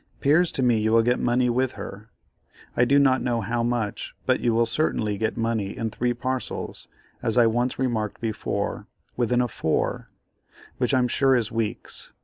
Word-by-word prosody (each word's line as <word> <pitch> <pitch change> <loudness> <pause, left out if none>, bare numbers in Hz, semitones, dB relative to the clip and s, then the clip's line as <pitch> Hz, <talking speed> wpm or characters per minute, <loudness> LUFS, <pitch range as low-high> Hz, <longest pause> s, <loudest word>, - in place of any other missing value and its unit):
'Pears 160 +5 +3
to 130 - -1
me 120 -3 +3
you 110 +1 +1
will 115 0 +5
get 120 +2 +2
money 125 +1 +2
with 125 +1 +1
her, 105 +3 -9 0.7
I 120 - +4
do 140 +3 +4
not 135 -2 +4
know 120 -2 0
how 120 +1 -1
much, 115 -3 -2
but - - +2
you 120 - +1
will 115 +1 +3
certainly 115 -4 0
get 110 +3 -2
money 115 -4 -1
in 115 -1 -2
three 120 +2 -1
parcels, 130 +1 -4 0.3
as 115 -1 -1
I 120 - +6
once 120 +3 0
remarked 115 -5 -1
before, 110 -2 -3 0.3
within 125 0 +1
a 125 - +1
4, 80 -8 -1 0.7
which - - +2
I'm 125 -1 +3
sure 135 +2 +3
is 115 -2 0
weeks. 115 -2 -4
120 Hz, 180 wpm, -25 LUFS, 115-125 Hz, 0.7 s, I